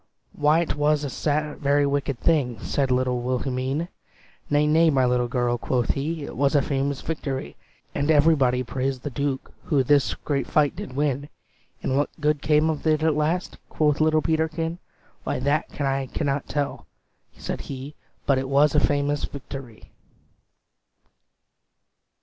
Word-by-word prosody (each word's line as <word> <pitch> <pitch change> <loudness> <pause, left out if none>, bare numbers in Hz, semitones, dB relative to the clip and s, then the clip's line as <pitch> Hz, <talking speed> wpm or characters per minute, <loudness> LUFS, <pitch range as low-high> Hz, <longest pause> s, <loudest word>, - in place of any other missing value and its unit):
"Why 155 +3 +3
't - - -2
was 150 0 +2
a 150 +2 -1
very 145 0 +3
wicked 140 -2 -1
thing!" 135 -9 +1
Said 135 +4 -1
little 125 -1 +1
Wilhelmine. 130 +4 -1 0.6
"Nay 145 +1 +3
nay 160 +2 +4
my 135 -4 +3
little 125 0 +1
girl," 120 -1 0
quoth 125 -1 0
he, 155 +3 -3
"It - - -7
was 140 +1 +2
a 145 - +5
famous 140 0 -1
victory. 140 -4 -4 0.4
"And 145 +2 -1
everybody 145 -5 +4
praised 130 +1 -3
the 145 - -4
Duke 140 0 -3
Who 145 -5 +2
this 145 +1 +3
great 140 -2 -2
fight 150 -2 +2
did 130 - -7
win." 145 0 -1 0.5
"And 130 - 0
what 145 - +1
good 150 -1 +1
came 150 +1 +3
of 160 0 -2
it 155 0 +2
at 160 -1 +3
last?" 155 +4 -1
Quoth 150 -1 +1
little 155 0 +3
Peterkin. 160 +1 -1 0.4
"Why, - - -1
that 140 +4 0
I 135 -1 0
cannot 140 -2 -1
tell," 145 -1 -3 0.5
said - - -4
he, 135 +2 -7 0.3
"But 135 -2 +3
't 130 - -3
was 140 +2 +4
a 150 - +5
famous 145 0 +1
victory." 135 -4 -9
145 Hz, 155 wpm, -24 LUFS, 135-150 Hz, 0.6 s, a